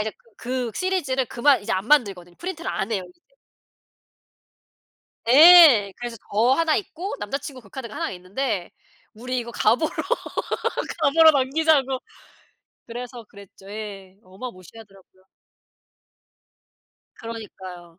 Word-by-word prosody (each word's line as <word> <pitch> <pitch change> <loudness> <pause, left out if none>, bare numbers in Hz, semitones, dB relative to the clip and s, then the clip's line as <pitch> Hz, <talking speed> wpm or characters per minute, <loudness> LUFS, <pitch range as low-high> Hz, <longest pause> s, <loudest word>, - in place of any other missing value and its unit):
이제 215 0 -2 0.2
그 250 -1 -3
시리즈를 335 -9 -1
그만 260 +4 +2
이제 - - -3
안 190 +2 -2
만들거든. 195 -11 +1
프린트를 355 0 -6
안 195 +3 -3
해요 190 -4 -2
이제. 350 -1 -23 2.1
예. 290 - +8
그래서 240 -1 -6 0.2
저 220 +4 +3
1 320 +2 +2
있고 380 0 -5
남자친구 265 +5 -5
그 215 - -19
카드가 235 0 -8
1 - - -3
있는데 185 +2 -4 0.4
"우리 250 +3 -4
이거 235 -1 -5
가보로 235 +7 +1 1.1
가보로 315 +2 +6
남기자."고 275 -1 +1 0.9
그래서 240 0 -8
그랬죠. 200 -1 -15
예. 200 -3 -8
어마 195 +7 -9
무시하더라고요. 195 -1 -17 1.9
그러니까요. 185 -6 -10
235 Hz, 260 characters per minute, -23 LUFS, 200-280 Hz, 2.1 s, 예